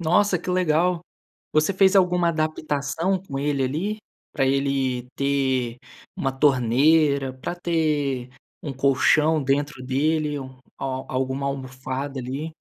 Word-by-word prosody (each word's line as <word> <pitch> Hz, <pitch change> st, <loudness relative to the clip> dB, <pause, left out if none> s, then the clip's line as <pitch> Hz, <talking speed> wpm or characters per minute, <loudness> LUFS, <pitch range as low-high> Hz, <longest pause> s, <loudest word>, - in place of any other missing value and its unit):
Nossa 180 Hz, +3 st, +3 dB
que 175 Hz, -, -9 dB
legal, 180 Hz, -1 st, +2 dB, 0.5 s
você 155 Hz, +5 st, +3 dB
fez 190 Hz, 0 st, +4 dB
alguma 180 Hz, -2 st, +3 dB
adaptação 155 Hz, +3 st, -1 dB
com 145 Hz, -8 st, -7 dB
ele 140 Hz, -1 st, 0 dB
ali, 170 Hz, +11 st, -2 dB, 0.4 s
para 135 Hz, -3 st, +1 dB
ele 135 Hz, -2 st, 0 dB
ter 130 Hz, -3 st, 0 dB, 0.4 s
uma 135 Hz, -, 0 dB
torneira, 140 Hz, +2 st, +3 dB
para 130 Hz, +7 st, -6 dB
ter 150 Hz, -7 st, 0 dB, 0.3 s
um 145 Hz, -, -4 dB
colchão 140 Hz, +3 st, +3 dB
dentro 140 Hz, 0 st, -1 dB
dele, 150 Hz, +3 st, 0 dB, 0.4 s
al 130 Hz, -1 st, -3 dB
alguma 130 Hz, +1 st, -1 dB
almofada 135 Hz, 0 st, -4 dB
ali. 140 Hz, +6 st, -5 dB
140 Hz, 120 wpm, -24 LUFS, 130-160 Hz, 0.5 s, fez